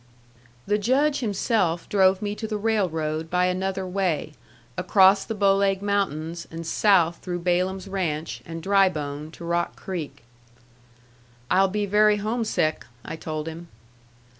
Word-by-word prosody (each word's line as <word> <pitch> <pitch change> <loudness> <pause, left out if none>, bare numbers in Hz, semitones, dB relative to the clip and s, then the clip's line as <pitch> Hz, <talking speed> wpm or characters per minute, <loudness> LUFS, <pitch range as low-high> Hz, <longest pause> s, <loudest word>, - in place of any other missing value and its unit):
The 205 +1 +1
Judge 275 +7 +2
himself 200 -6 0
drove 190 -1 +3
me 205 0 -2
to 220 +1 -5
the 215 -1 -2
railroad 165 -8 -1
by 180 +1 +2
another 190 +1 -1
way 180 -5 -1 0.4
across 190 +1 +4
the 225 - -4
Bow 200 -1 +4
Leg 195 0 +1
Mountains, 170 -5 -2
and 165 0 -7
south 170 -1 +3
through 175 -1 -4
Balaam's 185 +2 0
Ranch 165 -5 -3
and 165 0 -8
Drybone 155 -7 +1
to 170 - -9
Rock 170 0 -1
Creek. 155 -8 -6 1.3
"I'll 190 +1 +5
be 205 +2 -1
very 210 +1 +4
homesick," 215 -7 -1 0.2
I - - -5
told 155 -1 -5
him. 165 +1 -7
185 Hz, 140 wpm, -24 LUFS, 165-205 Hz, 1.3 s, I'll